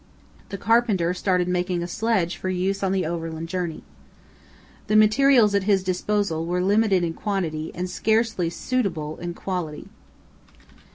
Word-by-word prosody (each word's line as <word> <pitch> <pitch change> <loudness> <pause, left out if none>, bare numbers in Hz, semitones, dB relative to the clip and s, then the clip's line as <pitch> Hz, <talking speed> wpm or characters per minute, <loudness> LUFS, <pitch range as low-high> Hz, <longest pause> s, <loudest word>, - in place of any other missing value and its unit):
The 200 - -5
carpenter 205 -5 +2
started 180 -1 0
making 180 -1 -1
a - - -4
sledge 190 -3 0
for 185 - -4
use 185 +2 -1
on 195 -1 0
the 190 -2 0
overland 165 0 -4
journey. 175 -3 -3 1.0
The 215 - +1
materials 215 +1 +5
at 200 -1 +1
his 195 -2 +2
disposal 185 -2 -1
were 180 +1 0
limited 200 -2 +3
in 165 -1 -1
quantity 165 -6 -3
and 180 +1 -3
scarcely 220 -3 0
suitable 170 -9 -2
in 175 0 -6
quality. 175 -6 -5
185 Hz, 145 wpm, -24 LUFS, 170-210 Hz, 1.0 s, materials